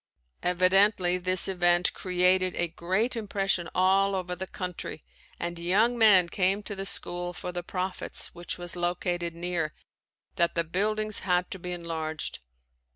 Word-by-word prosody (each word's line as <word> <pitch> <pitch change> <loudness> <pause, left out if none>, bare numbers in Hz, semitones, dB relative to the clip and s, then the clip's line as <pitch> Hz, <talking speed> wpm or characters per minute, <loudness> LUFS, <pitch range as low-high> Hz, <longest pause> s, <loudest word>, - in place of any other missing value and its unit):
Evidently 185 0 +3
this 185 0 +1
event 175 -1 +2
created 185 0 +2
a 175 - 0
great 190 +9 -1
impression 195 -5 -1
all 195 +2 +3
over 180 -1 -3
the 190 +1 -6
country 180 - -6 0.4
and 170 0 -4
young 205 +8 +2
men 205 -6 +6
came 190 +3 0
to 205 - -6
the 195 0 -2
school 175 -2 +1
for 180 - -6
the 175 0 -4
prophets 185 +1 -5
which 175 0 -5
was 175 -1 +2
located 175 -1 -2
near, 170 -2 -3 0.6
that 170 0 +1
the 170 - +1
buildings 215 +5 0
had 180 -1 0
to 190 - -5
be 180 +1 -6
enlarged. 165 -2 -4
180 Hz, 150 wpm, -27 LUFS, 175-195 Hz, 0.6 s, men